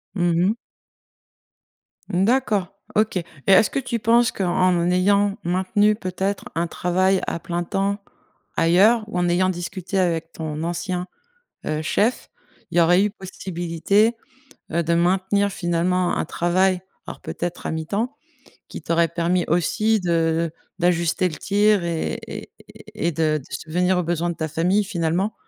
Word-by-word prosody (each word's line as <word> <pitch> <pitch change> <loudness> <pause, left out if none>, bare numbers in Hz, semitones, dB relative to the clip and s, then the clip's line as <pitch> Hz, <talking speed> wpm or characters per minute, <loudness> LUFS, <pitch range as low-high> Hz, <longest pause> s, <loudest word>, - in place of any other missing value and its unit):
Mmh 175 -2 +2 0.2
mh. 220 - 0 1.5
Mmh, 180 +2 +1
d'accord, 220 -7 +1 0.3
OK. 215 -3 +2
Et 170 - -1 0.2
est-ce 195 +3 +6
que - - -1
tu 240 -3 -3
penses 235 +2 +3
qu'en 180 -1 +1
ayant 200 +2 +2
maintenu, 190 +4 +2
peut-être, 190 0 -3
un 170 +1 0
travail 185 +3 +1
à 170 - -2
plein 175 +1 -3
temps, 200 +3 -1 0.6
ailleurs 200 +7 +4
ou 180 - -4
en 175 0 +1
ayant 185 +2 +2
discuté 185 +2 -3
avec 165 -2 0
ton 155 -1 -4
ancien, 180 +1 -2 0.6
heu, 155 0 -1
chef, 215 +9 0 0.4
il 175 - 0
y - - +7
aurait 175 +4 +5
eu 210 - 0
possibilité, 190 +3 0 0.6
heu, 170 +1 +1
de 170 +2 +1
maintenir 190 +4 +2
finalement 175 +1 0
un - - -1
travail, 180 +2 +1 0.3
alors - - -8
peut-être 175 0 -5
à - - -1
mi-temps, 200 - -2 0.5
qui - - -8
t'aurait 170 0 +2
permis 170 +1 0
aussi 215 +6 +2
de 165 -2 +1 0.3
d'ajuster 175 +1 +2
le 155 - -7
tir 205 +1 +2
et 170 -2 -2
et - - -7 0.5
et 170 - 0
de 155 -1 +1
de 135 - -14
subvenir 180 +3 0
aux 180 - +1
besoins 175 +1 -1
de 170 - -3
ta 160 - -3
famille 180 +7 +1
finalement, 180 +1 -1
180 Hz, 150 wpm, -22 LUFS, 170-200 Hz, 1.5 s, y